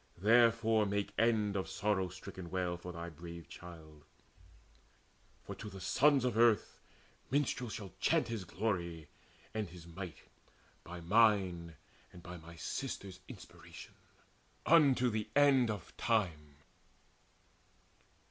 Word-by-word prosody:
Therefore 115 Hz, +1 st, +4 dB
make 100 Hz, 0 st, -2 dB
end 110 Hz, -3 st, +2 dB
of 95 Hz, -, -2 dB
sorrow 100 Hz, -3 st, 0 dB
stricken 95 Hz, -1 st, -9 dB
wail 90 Hz, -1 st, -1 dB
For 90 Hz, +1 st, -8 dB
thy 85 Hz, 0 st, -6 dB
brave 85 Hz, +1 st, -10 dB
child; 80 Hz, -4 st, -12 dB, 1.4 s
for -, -, -7 dB
to 105 Hz, -, -8 dB
the 95 Hz, -1 st, -9 dB
sons 135 Hz, +8 st, +3 dB
of 125 Hz, -4 st, 0 dB
earth 115 Hz, -2 st, +3 dB, 0.5 s
Minstrels 130 Hz, -4 st, 0 dB
shall 100 Hz, -5 st, -7 dB
chant -, -, +2 dB
his 115 Hz, -4 st, -4 dB
glory 85 Hz, -5 st, -3 dB, 0.4 s
and 110 Hz, -4 st, -3 dB
his 85 Hz, -1 st, -12 dB
might, 85 Hz, 0 st, -8 dB, 0.6 s
By 85 Hz, +1 st, -8 dB
mine 90 Hz, -4 st, +3 dB, 0.4 s
and 90 Hz, -, -13 dB
by 90 Hz, 0 st, -8 dB
my 85 Hz, 0 st, -12 dB
sisters' 95 Hz, +5 st, -5 dB
inspiration, -, -, -12 dB, 0.7 s
Unto 135 Hz, -6 st, +5 dB
the 110 Hz, -1 st, -3 dB
end 140 Hz, -4 st, +5 dB
of 105 Hz, -5 st, -5 dB
time. 80 Hz, -11 st, 0 dB
95 Hz, 120 wpm, -34 LUFS, 85-115 Hz, 1.4 s, Unto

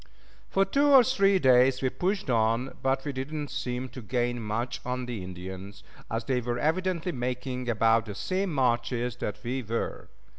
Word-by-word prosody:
For 195 Hz, 0 st, +3 dB
two 280 Hz, +9 st, +2 dB
or 270 Hz, -3 st, +8 dB
three 200 Hz, -6 st, +3 dB
days 130 Hz, -3 st, +4 dB
we 130 Hz, -, +3 dB
pushed 190 Hz, +1 st, -1 dB
on, 115 Hz, +1 st, +1 dB
but 135 Hz, +1 st, 0 dB
we 145 Hz, -, -2 dB
did 130 Hz, +2 st, -5 dB
not 150 Hz, -2 st, -4 dB
seem 125 Hz, +1 st, -3 dB
to 130 Hz, -, -9 dB
gain 120 Hz, +1 st, -1 dB
much 115 Hz, +3 st, -3 dB
on 125 Hz, 0 st, -3 dB
the 120 Hz, -6 st, -5 dB
Indians, 95 Hz, +2 st, -8 dB, 0.3 s
as 115 Hz, +1 st, -2 dB
they 125 Hz, -1 st, 0 dB
were 120 Hz, 0 st, -2 dB
evidently 180 Hz, +4 st, 0 dB
making 125 Hz, -1 st, -3 dB
about 115 Hz, 0 st, +3 dB
the 105 Hz, -, -6 dB
same 185 Hz, -, -1 dB
marches 125 Hz, -2 st, 0 dB
that 105 Hz, -, -3 dB
we 130 Hz, +2 st, -2 dB
were. 115 Hz, 0 st, -4 dB
125 Hz, 180 wpm, -28 LUFS, 115-145 Hz, 0.3 s, or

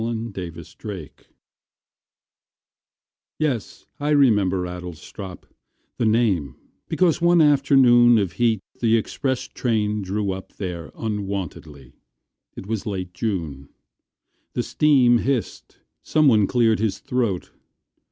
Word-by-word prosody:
Edward 115 Hz, 0 st, -3 dB
Thomas 85 Hz, -3 st, -8 dB
Adlestrop 95 Hz, -9 st, -8 dB, 2.1 s
YES, 135 Hz, -9 st, -3 dB
I 145 Hz, +1 st, -1 dB
remember 105 Hz, -11 st, +3 dB
Adlestrop 90 Hz, +1 st, -8 dB, 0.6 s
The 115 Hz, -, +2 dB
name 105 Hz, -, +1 dB, 0.3 s
because 175 Hz, -2 st, +2 dB
one 175 Hz, 0 st, +4 dB
afternoon 135 Hz, -5 st, +5 dB
Of 100 Hz, -5 st, 0 dB
heat 115 Hz, +1 st, +1 dB, 0.2 s
the 115 Hz, -1 st, +3 dB
express 130 Hz, +3 st, -2 dB
train 105 Hz, -3 st, -1 dB
drew 100 Hz, +1 st, -2 dB
up 95 Hz, 0 st, -8 dB
there 85 Hz, -5 st, -6 dB
Unwontedly. 95 Hz, -, -5 dB, 0.6 s
It -, -, -8 dB
was 110 Hz, +1 st, -4 dB
late 95 Hz, -3 st, -4 dB
June. 80 Hz, -11 st, -4 dB, 0.8 s
The -, -, -1 dB
steam 130 Hz, -6 st, +4 dB
hissed. 130 Hz, -3 st, -3 dB, 0.2 s
Someone 130 Hz, -10 st, +3 dB
cleared 115 Hz, -3 st, +2 dB
his 110 Hz, -3 st, 0 dB
throat. 115 Hz, -8 st, -2 dB
110 Hz, 105 wpm, -23 LUFS, 95-120 Hz, 2.1 s, afternoon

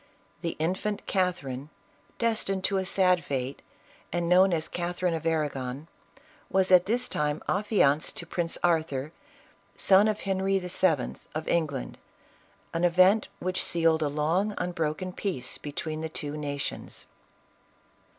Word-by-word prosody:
The 170 Hz, -2 st, -2 dB
infant 185 Hz, +6 st, -2 dB
Catherine, 150 Hz, -8 st, -1 dB, 0.5 s
destined 215 Hz, -5 st, 0 dB
to 195 Hz, -, +1 dB
a 190 Hz, -, -1 dB
sad 180 Hz, -2 st, +3 dB
fate, 135 Hz, -1 st, -3 dB, 0.5 s
and 175 Hz, 0 st, -1 dB
known 185 Hz, +2 st, +6 dB
as 160 Hz, -2 st, 0 dB
Catherine 175 Hz, 0 st, -1 dB
of 165 Hz, 0 st, -2 dB
Arragon, 145 Hz, -3 st, -2 dB, 0.6 s
was 190 Hz, 0 st, +2 dB
at 180 Hz, 0 st, +7 dB
this 245 Hz, +3 st, +1 dB
time 150 Hz, 0 st, -1 dB
affianced 185 Hz, -7 st, +2 dB
to 170 Hz, -, -6 dB
Prince 170 Hz, 0 st, -2 dB
Arthur, 155 Hz, -4 st, +1 dB, 0.6 s
son 195 Hz, +2 st, +5 dB
of 215 Hz, -1 st, -1 dB
Henry 195 Hz, 0 st, +1 dB
VII. 180 Hz, -6 st, +1 dB, 0.2 s
of 155 Hz, -, -3 dB
England, 150 Hz, -6 st, -1 dB, 0.7 s
an 165 Hz, -, -1 dB
event 185 Hz, +5 st, +5 dB
which 185 Hz, 0 st, -1 dB
sealed 165 Hz, -1 st, +2 dB
a 150 Hz, -, +2 dB
long, 165 Hz, +8 st, 0 dB
unbroken 175 Hz, +1 st, -2 dB
peace 175 Hz, -13 st, -3 dB
between 155 Hz, +2 st, -4 dB
the 160 Hz, -, -3 dB
two 150 Hz, -1 st, -5 dB
nations. 145 Hz, -1 st, -4 dB
170 Hz, 130 wpm, -28 LUFS, 150-190 Hz, 0.7 s, at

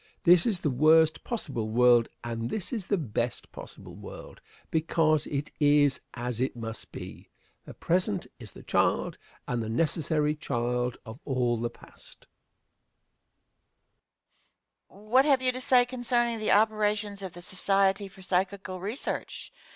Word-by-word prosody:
This 175 Hz, +1 st, +6 dB
is 205 Hz, -6 st, 0 dB
the 150 Hz, -, 0 dB
worst 155 Hz, +4 st, +4 dB
possible 135 Hz, -, -3 dB
world, 120 Hz, 0 st, +4 dB
and 115 Hz, 0 st, -4 dB
this 205 Hz, +1 st, -4 dB
is 210 Hz, -6 st, -4 dB
the 200 Hz, -, +1 dB
best 120 Hz, -, -3 dB
possible -, -, -11 dB
world -, -, -11 dB, 0.3 s
because 160 Hz, -1 st, +1 dB
it 145 Hz, 0 st, -3 dB
is 145 Hz, -2 st, +3 dB
as 120 Hz, -1 st, -4 dB
it 130 Hz, -, -1 dB
must 115 Hz, -1 st, -7 dB
be. -, -, -10 dB, 0.4 s
The -, -, -11 dB
present 185 Hz, +2 st, 0 dB
is 110 Hz, -5 st, -10 dB
the -, -, -13 dB
child, -, -, 0 dB, 0.3 s
and 120 Hz, -1 st, -1 dB
the 110 Hz, -, -4 dB
necessary 150 Hz, +3 st, +1 dB
child, 125 Hz, -3 st, -2 dB
of 110 Hz, +3 st, -10 dB
all 125 Hz, -3 st, 0 dB
the 120 Hz, +1 st, -2 dB
past. -, -, -16 dB, 2.6 s
Question. 205 Hz, +2 st, -18 dB
What 260 Hz, +2 st, +6 dB
have 275 Hz, -3 st, +3 dB
you 255 Hz, -, +5 dB
to 255 Hz, +1 st, -5 dB
say 250 Hz, -1 st, +5 dB
concerning 240 Hz, -2 st, -1 dB
the 215 Hz, -, -1 dB
operations 210 Hz, -1 st, +2 dB
of 190 Hz, -3 st, -6 dB
the 175 Hz, -, -9 dB
Society 195 Hz, +2 st, +1 dB
for 195 Hz, 0 st, -14 dB
Psychical 185 Hz, 0 st, -1 dB
Research? 210 Hz, +9 st, -5 dB
165 Hz, 145 wpm, -28 LUFS, 125-205 Hz, 2.6 s, This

